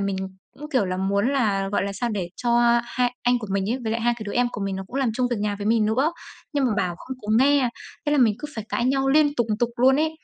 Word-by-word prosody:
mình 195 -1 -1 0.4
cũng, 300 +1 -10
kiểu 255 -8 +2
là, 185 -1 -2
muốn 200 +4 +1
là, 200 -7 +1
gọi 205 - +1
là, 200 - -3
sao 220 +5 -2
để 190 -5 -3
cho 235 0 +3
hai 245 0 -1
anh 245 0 +3
của 215 - -7
mình 195 +1 0
ấy, 255 - 0
với 220 -1 -2
lại 230 - -1
hai 240 +1 +2
cái 220 - -7
đứa 205 - -5
em 245 0 +2
của 200 - -5
mình 195 -1 -2
nó 190 - -5
cũng 250 - -7
làm 265 -4 +1
chung 250 +1 +1
việc 240 - 0
nhà 205 0 -1
với 205 - -4
mình 220 -1 +3
nữa. 265 +10 +1 0.4
Nhưng 285 -2 +1
mà - - +1
bảo 175 -3 0
không 260 - -7
có 210 - -9
nghe, 275 0 +4 0.4
thế 295 - +2
là 295 - +3
mình 230 -5 +4
cứ 300 - -6
phải 220 - -5
cãi 240 - -1
nhau 270 +1 +1
liên 290 +1 +4
tục 240 -5 0
tục 240 -1 +1
luôn 260 +2 +5
ấy. 315 +2 +1
240 Hz, 300 wpm, -24 LUFS, 205-260 Hz, 0.4 s, luôn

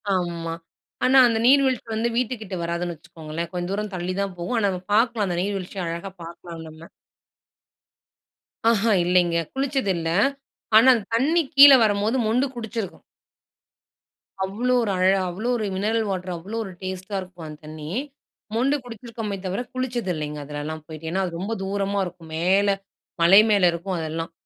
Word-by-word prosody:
ஆமா. 170 -2 -2 0.5
ஆனா, 265 +1 +5
அந்த 225 -1 0
நீர்வீழ்ச்சி 265 -3 +4
வந்து 230 +2 0
வீட்டுக்கிட்டே 220 -6 -2
வராதுன்னு 170 0 -2
வச்சுக்கோங்களேன்! 160 +1 -7
கொஞ்ச 175 0 -3
தூரம் 210 +1 -3
தள்ளி 180 +1 -3
தான் 195 -2 -3
போகும். 175 +8 -2
ஆனா, 205 - +2
நம்ம 185 -1 -4
பார்க்கலாம். 230 -2 +2
அந்த 175 -1 -2
நீர்வீழ்ச்சிய 195 -1 -3
அழகா 170 +3 -5
பார்க்கலாம் 170 0 -9
நம்ம. 160 +1 -13 1.8
ஆஹா. 225 0 +2
இல்லேங்க. 175 -1 +3 0.2
குளிச்சது 270 -6 0
இல்ல. 165 -1 -3 0.7
ஆனா, 240 +4 +7
அந்த 215 -4 -4
தண்ணீ 310 +8 +3
கீழ 280 +1 +11
வரும்போது 210 +3 +1
மொண்டு 245 +5 +2
குடிச்சிருக்கோம். 225 -3 -5 1.4
அவ்ளோ 235 +6 -1
ஒரு 205 - -1
அழ 185 - +1 0.3
அவ்ளோ 195 +7 -4
ஒரு 215 - -2
மினரல் 220 +3 0
வாட்டரு. 185 -1 -3
அவ்ளோ 205 +7 -6
ஒரு 195 - -8
டேஸ்ட்டா 185 +2 -5
இருக்கும், 180 -3 -10
அந்த 150 -1 -10
தண்ணீ. 155 0 -8 0.7
மொண்டு 265 +5 +2
குடிச்சிருக்கோமே 225 -3 -6
தவிர, 190 +5 -2
குளிச்சது 245 -6 -2
இல்லேங்க 150 -1 -4
அதுலெல்லாம் 150 +2 -6
போயிட்டு. 160 0 -8
ஏன்னா, 190 +2 0
அது 175 - -4
ரொம்ப 200 +5 -3
தூரமா 200 +1 -1
இருக்கும். 170 -2 -10
மேல, 190 +5 +3 0.5
மலை 180 +4 +8
மேல 205 -3 +3
இருக்கும் 180 +2 -4
அதெல்லாம். 165 +1 -4
190 Hz, 150 wpm, -24 LUFS, 170-225 Hz, 1.8 s, கீழ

